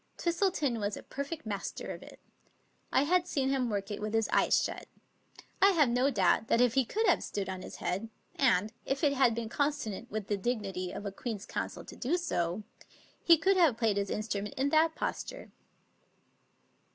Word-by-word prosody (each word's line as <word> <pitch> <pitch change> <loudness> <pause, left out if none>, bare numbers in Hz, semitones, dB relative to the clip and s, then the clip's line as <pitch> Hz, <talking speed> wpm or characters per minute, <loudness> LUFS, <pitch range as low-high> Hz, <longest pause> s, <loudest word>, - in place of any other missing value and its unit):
Twistleton 340 - 0
was 205 0 -2
a - - -9
per 280 - -4
fect 295 0 -7
master 200 -2 -4
of - - -10
it. - - -13 0.7
I 265 - +4
had 355 +3 +2
seen 270 -6 0
him 260 -3 +1
work 200 -1 -3
it 205 - -4
with 215 +1 -2
his 225 -1 +2
eyes - - +4
shut. - - -5 0.7
I 395 +1 +7
have 300 -7 +4
no 250 +3 +3
doubt 205 -2 +2
that 230 - +3
if 245 -2 +4
he 265 -1 +3
could 440 - 0
have - - +4
stood 200 -2 -3
on 190 -1 -5
his - - -8
head, 195 +5 -3 0.3
and 215 -5 +2
if 270 +2 -2
it 285 -2 +4
had 255 -4 +3
been 230 -1 -3
consonant 250 -4 -2
with 215 -3 -3
the 205 0 -1
dignity 195 -4 -2
of 205 - -7
a 200 - -3
Queen's 210 0 -5
Counsel - - -4
to - - -10
do 285 +8 0
so, 200 - -1 0.6
he 335 -1 +7
could 380 +5 +3
have 320 -10 +4
played 220 -4 +1
his 200 -1 -1
in - - -1
strument 210 -1 -4
in 270 +2 +1
that 320 +1 +3
posture. - - -4
235 Hz, 200 wpm, -31 LUFS, 205-290 Hz, 0.7 s, I